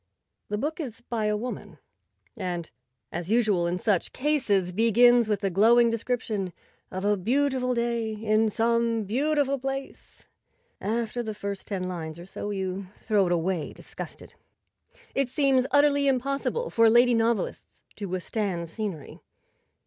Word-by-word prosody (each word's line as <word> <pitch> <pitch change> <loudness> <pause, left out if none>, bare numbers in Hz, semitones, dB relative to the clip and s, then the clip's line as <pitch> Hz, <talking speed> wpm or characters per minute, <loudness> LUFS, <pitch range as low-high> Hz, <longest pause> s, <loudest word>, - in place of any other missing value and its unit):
The 210 - -1
book 300 +9 -3
is 240 -8 -6
by 235 -2 -2
a 210 0 +1
woman, 245 +4 -6 0.6
and, 180 -6 -4 0.4
as 175 +1 -4
usual 210 -6 +2
in 175 +1 -1
such 195 -2 0
cases, 245 -11 +1
begins 230 +3 +5
with 210 -1 0
a 195 - +1
glowing 230 +5 +5
description 220 -5 -2 0.4
of 185 +1 -4
a 205 0 +3
beautiful 250 +4 +1
day 235 -2 -1
in 215 +1 +2
some 230 0 +1
beautiful 275 +5 +1
place. 270 +1 -6 0.6
After 230 +3 -1
the 220 -2 -5
first 200 -1 -5
ten 195 -3 -3
lines 165 -3 -5
or 170 - -9
so 195 +2 -6
you 190 -1 -3
throw 205 -4 +1
it - - -1
away 175 -1 -1
disgusted. - - -9 0.8
It 275 -2 0
seems 265 -1 +2
utterly 285 0 +4
impossible 275 - 0
for 230 -1 +5
lady 240 +2 +5
novelists 230 -3 -1
to 205 - -4
withstand 185 -1 -2
scenery. 185 -7 -5
220 Hz, 140 wpm, -27 LUFS, 195-245 Hz, 0.8 s, begins